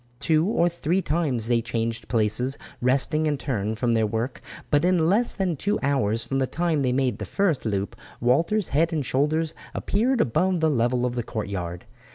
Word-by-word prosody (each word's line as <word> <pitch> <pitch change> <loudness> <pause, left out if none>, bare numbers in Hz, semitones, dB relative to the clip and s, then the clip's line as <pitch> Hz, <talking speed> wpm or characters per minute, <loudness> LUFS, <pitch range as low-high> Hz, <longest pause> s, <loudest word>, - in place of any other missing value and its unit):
Two 160 +2 +2
or 175 -5 +2
three 170 +1 0
times 145 -8 0
they 120 -1 +2
changed 115 0 -3
places, 120 +4 0 0.2
resting 140 +5 +2
in 145 -1 0
turn 110 -6 -2
from 120 +1 0
the 110 -1 +2
work; 115 +5 -3 0.3
but 145 0 +3
in 175 -3 +3
less 220 +7 +2
than 185 -4 0
two 205 +9 0
hours 115 -5 +1
from 135 - -1
the 130 - +1
time 165 -1 0
they 130 -2 +1
made 130 0 0
the - - -4
first 180 -11 0
loop 100 -2 -2 0.2
Walter's 165 - +2
head 165 +4 +2
and 155 -4 -1
shoulders 155 +5 0 0.2
appeared 240 +5 +1
above 180 - +2
the 160 -1 +2
level 125 -1 +1
of 125 - -1
the 120 - -1
courtyard. 95 -6 -5
135 Hz, 190 wpm, -25 LUFS, 115-165 Hz, 0.3 s, but